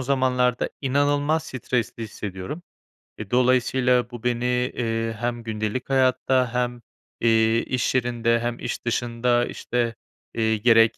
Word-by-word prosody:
zamanlarda 125 -2 +1
inanılmaz 145 +3 +1
stresli 125 -4 -3
hissediyorum. 105 - -6 0.6
Eee, 105 -2 -8
dolayısıyla 125 0 +3
bu 120 -2 -9
beni, 125 +1 0
ııı, 115 -1 -1
hem 120 +1 -3
gündelik 110 +3 -3
hayatta 130 -1 +2
hem, 125 -1 -1 0.4
iii, 115 0 +3
iş 125 0 -1
yerinde 120 -2 +1
hem 120 0 -3
iş - - -5
dışında, 120 +1 +1
işte, 120 -2 -2 0.4
iii, 110 -2 +1
gerek 115 -1 +5
120 Hz, 120 wpm, -24 LUFS, 115-125 Hz, 0.6 s, gerek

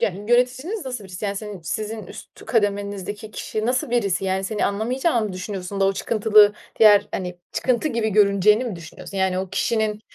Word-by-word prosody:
Yöneticiniz 245 - 0
nasıl 250 -5 -5
birisi? 185 +2 -8
Yani, 200 -1 -2
senin 210 -2 -6
sizin 215 +5 -4
üst - - -12
kademenizdeki 205 -1 -2
kişi 215 0 -4
nasıl 250 0 0
birisi? 200 -6 0
Yani, 190 0 -1
seni 210 +2 0
anlamayacağını 235 +4 0
mı 200 - -6
düşünüyorsun 185 +1 -5
da - - +4
o 195 - +3
çıkıntılı 210 0 +4 0.3
diğer 210 -2 +6
hani 180 -1 -4
çıkıntı 255 +4 0
gibi 230 -5 -1
görüneceğini 210 +2 +4
mi 225 -7 -4
düşünüyorsun? 170 +4 -10
Yani, 190 -1 +1
o 190 0 -3
kişinin, 215 -2 0
210 Hz, 170 wpm, -22 LUFS, 195-230 Hz, 0.3 s, diğer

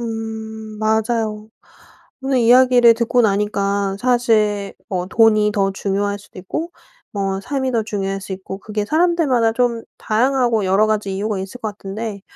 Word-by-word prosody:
음 220 -1 -6
맞아요. 220 0 -1 0.7
오늘 265 -1 +1
이야기를 245 0 +6
듣고 235 +2 +1
나니까 200 -1 0
사실 220 -5 +1
뭐 180 -2 -2
돈이 215 +1 +3
더 195 -1 +1
중요할 200 +1 -2
수도 200 - -15
있고 315 - -4 0.4
뭐 195 -1 -2
삶이 265 +4 -2
더 230 -2 +1
중요할 195 -2 -3
수 195 - -7
있고 190 0 -7
그게 210 +1 -4
사람들마다 310 -7 +2
좀 235 -1 0 0.2
다양하고 240 -1 +1
여러 195 +3 +3
가지 210 -3 -1
이유가 205 0 -2
있을 190 +6 -7
것 220 - -2
같은데 205 0 -6
215 Hz, 305 characters per minute, -19 LUFS, 200-235 Hz, 0.7 s, 이야기를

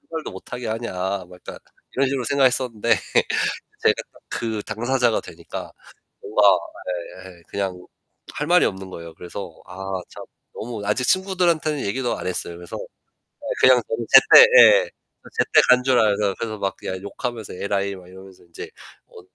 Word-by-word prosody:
출발도 160 -1 -7
못 95 - -12
하게 125 -2 -5
하냐.' 95 -4 -3
뭐 90 0 -14
약간 - - -10 0.4
이런 135 0 +2
식으로 135 -3 -2
생각했었는데 130 -4 +1 0.9
제가 - - +4 0.3
그 110 -2 -3
당사자가 120 +1 0
되니까 - - -9 0.5
뭔가 105 - -1 0.9
예예 85 -2 -15
그냥 95 -2 -4 0.5
할 150 - -4
말이 180 +1 +5
없는 95 0 -4
거예요. 85 -2 -9
그래서 90 -1 -9
아 95 +1 -9 0.3
참 - - -10 0.3
너무 115 -2 -6
아직 120 +5 0
친구들한테는 175 -6 +1
얘기도 120 +4 -2
안 - - -7
했어요. 85 -1 -3
그래서 85 0 -8
예 - - -13 0.6
그냥 130 -2 +6
저는 115 +1 -4
제때 135 - +9
예 - - +7 0.5
제때 - - +4
간 125 0 +6
줄 130 -2 +3
알아서 105 -2 +1
그래서 110 -2 -4
막 95 -1 -2
그냥 95 0 -6
욕하면서 110 +1 -6
"에라이" 100 +1 -2
막 90 -1 -14
이러면서 95 -1 -15
인제 85 -1 -10 0.4
어 - - -14
110 Hz, 330 characters per minute, -22 LUFS, 95-130 Hz, 0.9 s, 제때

